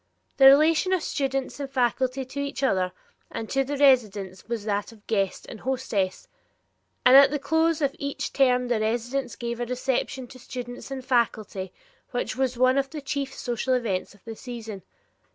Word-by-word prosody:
The 270 - +8
relation 315 +6 +5
of 370 - +1
students 270 0 -2
and 280 -1 -4
faculty 260 0 0
to 270 +2 -7
each 280 0 -3
other 185 -8 +2 0.4
and 225 - -5
to 270 0 +2
the 285 +2 -4
residents 210 -9 +2
was 230 -3 -3
that 205 0 -1
of 215 -2 -18
guest 195 -4 -1
and 220 - -9
hostess, 230 -8 -2 0.8
and 250 +1 +8
at 275 0 +9
the 295 - -1
close 320 +2 +1
of 275 0 0
each 280 0 -4
term 250 -2 +3
the 240 -2 +1
residents 240 +3 -1
gave 235 0 -4
a 240 - -1
reception 255 +1 -2
to 255 - -12
students 245 0 -7
and 265 -2 -6
faculty 215 -6 0 0.4
which 245 - -3
was 260 -1 -1
one 255 +2 +4
of 275 0 -2
the 305 - -6
chief 275 -1 -3
social 250 +1 -1
events 205 -6 -2
of 200 - -24
the 225 -1 -6
season. 225 -5 -7
255 Hz, 180 wpm, -26 LUFS, 225-275 Hz, 0.8 s, at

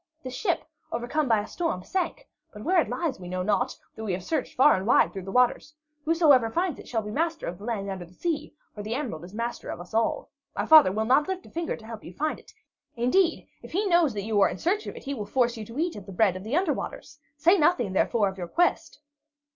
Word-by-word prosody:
This 255 -1 -6
ship, 330 - 0 0.3
overcome 245 +6 -1
by 225 -3 +3
a - - -7
storm, 325 - -3
sank; 360 - -3 0.2
but 210 -1 -10
where 360 +1 +4
it - - -4
lies 330 - -2
we 180 - -8
know 185 0 -2
not, 200 0 0 0.2
though 220 - -7
we 195 - -1
have 180 0 -4
searched 305 - -2
far 280 +4 +6
and 190 +2 -3
wide - - +4
through 190 -3 -6
the 195 - -6
waters. 250 +5 +2 0.3
Whosoever 300 -8 +5
finds 345 +4 -1
it - - -11
shall 225 -3 -1
be 210 - -6
master 325 +5 -1
of 175 +2 -5
the 205 - -9
land 215 -4 -2
under 190 -2 -5
the 175 +2 -20
sea, 305 - -3 0.2
for 210 - -7
the 215 +3 -3
emerald 235 - -4
is 185 +4 -11
master 235 +1 -4
of - - -5
us 175 +3 -11
all. 230 - 0 0.2
My - - -1
father 310 -11 +8
will 215 +3 -1
not 265 +5 +3
lift 375 -1 -4
a - - -15
finger 335 0 -2
to 220 - -14
help 225 -1 -8
you 175 - -10
find 310 +6 -1
it; - - -18 0.4
indeed, 325 +9 +2
if - - -12
he 405 +5 +1
knows 340 - +3
that 200 - -3
you 215 -2 +1
are - - +5
in - - -5
search 410 +5 0
of - - -6
it, - - -10
he 280 - -3
will 210 -6 -5
force 240 +1 +1
you 220 - -6
to 230 +5 -10
eat 335 +2 0
of 205 -1 -10
the - - -8
bread 190 -1 +3
of 185 - -7
the 225 +7 -2
under 350 -3 +2
waters. 295 +1 -7 0.2
Say 345 +6 +4
nothing, 270 - +2
therefore, 210 +2 +2
of 190 0 -5
your 175 - -4
quest." 345 - 0
240 Hz, 265 wpm, -26 LUFS, 205-320 Hz, 0.4 s, father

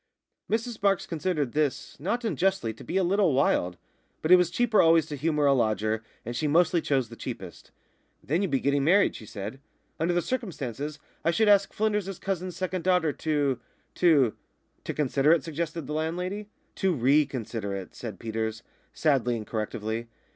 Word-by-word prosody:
Mrs 230 +1 -2
Marks 195 -2 +2
considered 155 -5 -1
this, 145 -2 -1
not 220 - -2
unjustly, 190 - 0
to 115 - -13
be - - -2
a 190 - +3
little 185 -2 +3
wild. 90 -10 +2 0.5
But 155 - +1
it - - +12
was 180 -2 +3
cheaper 220 +3 +3
always 165 -1 +5
to 150 - -6
humour 150 +1 +1
a 140 - +5
lodger; 110 -3 +1 0.2
and 120 +2 -4
she 150 +5 0
mostly 170 +2 +3
chose 135 -7 0
the 115 - -10
cheapest. 95 -8 -8 0.5
"Then 165 +7 0
you'd 195 - 0
be 135 - +1
getting 140 0 +2
married," 190 +7 +4
she 110 - -10
said. 105 +7 -6 0.4
"Under 175 +2 +1
the 175 - +1
circumstances 150 - -4 0.3
I - - +2
should 215 +6 +2
ask 200 -1 +5
Flynders's 210 -3 -1
cousin's 185 -2 -3
second 185 -1 -2
daughter 180 -5 +2
to 145 -5 0 0.3
to 145 -10 +4 0.2
" - - -43
"To - - -2
consider 145 +1 +3
it," 170 - +1
suggested 165 0 -4
the 150 - -5
landlady. 180 +6 -3 0.3
"To 190 -2 +2
re 140 +3 +4
consider 115 -6 -4
it," 95 -2 -7
said 110 -5 -7
Peters, 110 0 -3 0.3
sadly 130 -6 +2
and 110 - -6
correctively. 110 +1 -3
155 Hz, 180 wpm, -27 LUFS, 120-180 Hz, 0.5 s, it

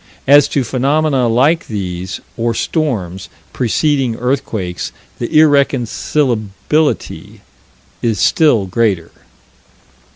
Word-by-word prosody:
As 145 +1 +6
to 140 -2 0
phenomena 135 +2 +1
like 135 +9 +2
these, 95 -3 -5
or 115 0 -1
storms, 100 - -2 0.2
preceding 130 0 0
earthquakes, 115 - -3 0.3
the 120 - -4
irreconcilability 140 -2 0 0.6
is 115 -4 0
still 120 - +3
greater. 95 -4 -1
120 Hz, 85 wpm, -16 LUFS, 105-145 Hz, 0.6 s, As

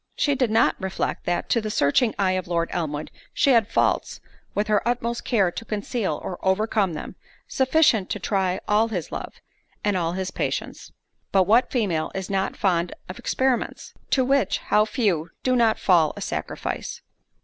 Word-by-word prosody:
she 290 - +2
did 255 -3 +1
not 225 +1 +3
reflect, 190 0 -3
that 175 0 -1
to 230 - +2
the 215 - -4
searching 210 - +2
eye 195 -2 +2
of 185 -1 -2
Lord 170 -1 -1
Elmwood, 155 -3 -3 0.2
she 280 - +4
had 230 -3 +4
faults, - - 0 0.4
with 205 - +1
her 210 -1 +2
utmost 235 0 -1
care 200 -8 +2
to 230 - -6
conceal 210 - -2
or 180 - -5
overcome 195 -1 +1
them, 150 - -7 0.3
sufficient 260 -7 +3
to - - -2
try 190 -3 0
all 215 +2 +3
his 185 -8 -4
love, - - -6 0.5
and 205 -1 +1
all 170 -2 0
his 190 0 -3
patience. - - -4 0.4
But 190 -1 +5
what 225 +7 +4
female 190 -11 0
is 190 0 -4
not 195 0 -1
fond 175 -3 0
of 185 - -8
experiments? 260 -2 -1 0.2
To 260 -2 +3
which, 275 +1 +2
how 210 0 +2
few 195 - 0
do 255 -1 +2
not 230 -2 +3
fall 170 -5 +3
a - - -6
sacrifice! - - -4
205 Hz, 175 wpm, -24 LUFS, 180-230 Hz, 0.5 s, But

